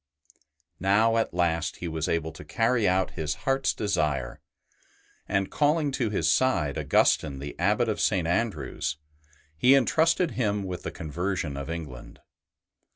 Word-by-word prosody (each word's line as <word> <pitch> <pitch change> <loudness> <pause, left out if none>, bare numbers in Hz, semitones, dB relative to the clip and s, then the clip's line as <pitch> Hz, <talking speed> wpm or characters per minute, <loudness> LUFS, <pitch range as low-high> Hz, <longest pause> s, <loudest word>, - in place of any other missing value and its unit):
Now 110 +4 +3
at 115 - 0
last 85 -1 0
he 90 - -5
was 80 -1 -2
able 80 -1 -1
to - - -11
carry 115 +7 +1
out 95 0 +1
his 75 -3 -3
heart's 135 0 +2
desire; 75 - -1 0.9
and, 95 -1 0
calling 150 0 +2
to 125 -4 -1
his 105 - 0
side 75 - +2
Augustine, 70 -3 +2
the 70 +2 -7
Abbot 105 +6 +2
of 110 - -1
St. 90 -6 +1
Andrew's, 75 - -2 0.6
he 125 - +5
entrusted 160 +6 +2
him 105 -4 -1
with 90 -2 -5
the - - -4
conversion 85 -1 -3
of 70 +2 -6
England. 80 -7 -7
95 Hz, 145 wpm, -27 LUFS, 80-115 Hz, 0.9 s, he